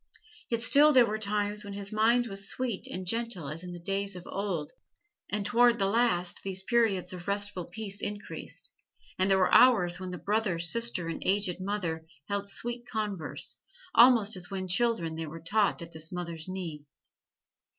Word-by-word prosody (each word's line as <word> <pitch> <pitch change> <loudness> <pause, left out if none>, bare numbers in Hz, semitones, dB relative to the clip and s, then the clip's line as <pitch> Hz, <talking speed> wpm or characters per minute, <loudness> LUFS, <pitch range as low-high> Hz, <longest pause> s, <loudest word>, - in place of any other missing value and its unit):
Yet 230 -1 -1
still 290 +5 +6
there 250 -3 +7
were 215 0 -3
times 210 0 0
when 200 -1 -7
his 200 0 -1
mind 230 +3 +3
was 195 -3 0
sweet 245 -6 -3
and 185 0 -6
gentle 225 -6 -2
as 155 +3 -5
in 180 - -7
the 175 - -7
days 195 +2 -2
of 180 - -9
old; 190 -7 -3 0.6
and 205 0 -2
toward 240 +1 +4
the 195 - +1
last 195 -4 +1
these 190 -1 -3
periods 200 -5 +1
of 180 0 -9
restful 200 -2 -1
peace 200 +2 -6
increased, 205 0 -5 0.5
and 190 +1 +2
there 195 - +4
were 185 - +2
hours 190 -9 +5
when 185 -1 -6
the 180 - -5
brother, 200 +1 -1
sister 180 +1 +3
and 165 - -5
aged 190 -2 0
mother 175 -5 -3 0.2
held 200 0 -2
sweet 240 +4 -2
converse, 205 -8 -3 0.3
almost 235 -6 +6
as 180 -1 -1
when 190 -2 -4
children 185 -4 +1
they 160 0 -5
were 165 +2 -8
taught 200 +1 +1
at 165 - -11
this 160 0 -4
mother's 170 -2 -5
knee. 175 -6 -6
195 Hz, 180 wpm, -29 LUFS, 180-220 Hz, 0.6 s, there